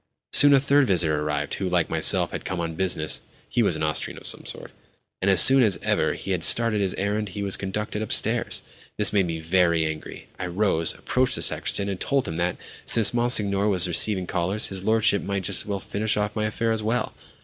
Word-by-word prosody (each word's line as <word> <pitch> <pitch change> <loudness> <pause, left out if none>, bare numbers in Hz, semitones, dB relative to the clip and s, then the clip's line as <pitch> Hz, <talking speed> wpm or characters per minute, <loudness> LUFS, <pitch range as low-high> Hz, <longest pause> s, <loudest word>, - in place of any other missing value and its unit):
Soon 145 - +9
a - - +4
third 140 0 +2
visitor 80 -6 0
arrived 75 -1 -3
who, 95 - -3
like 90 -2 0
myself, - - +4
had - - -6
come 95 - -5
on 85 -1 -4
business 85 -3 -1 0.3
(he - - -1
was - - +1
an - - -4
Austrian 75 0 -2
of - - -12
some - - -2
sort); - - -9 0.5
and 95 - 0
as 95 -3 +5
soon 135 +9 +8
as 105 -8 +1
ever - - 0
he 95 - -7
had 90 -3 -2
stated 115 -3 +2
his 95 -2 -2
errand 105 +1 -3
he 100 +2 -6
was 100 -1 0
conducted 105 +2 -5
upstairs! 110 - 0 0.3
This 105 -1 +1
made 100 -3 +1
me 80 -1 -5
very 85 -1 +1
angry. 80 0 -7
I 90 - -4
rose, 90 -3 -1
approached 130 0 0
the - - -1
sacristan, 100 - +1
and 95 -2 -5
told 140 -2 -1
him 80 - -5
that, 85 +1 -2 0.3
since 115 -1 +5
Monsignor 105 -4 +1
was 95 -3 +1
receiving 95 +2 +1
callers, 95 +4 -2
his 95 -1 -5
lordship 110 -1 +2
might 100 -1 -4
just - - 0
as - - -9
well 100 -1 -3
finish 105 +3 -3
off 105 0 -3
my 110 -1 -2
affair 115 +1 -2
as 110 -1 -1
well. 110 +2 -2
100 Hz, 220 wpm, -23 LUFS, 90-110 Hz, 0.5 s, Soon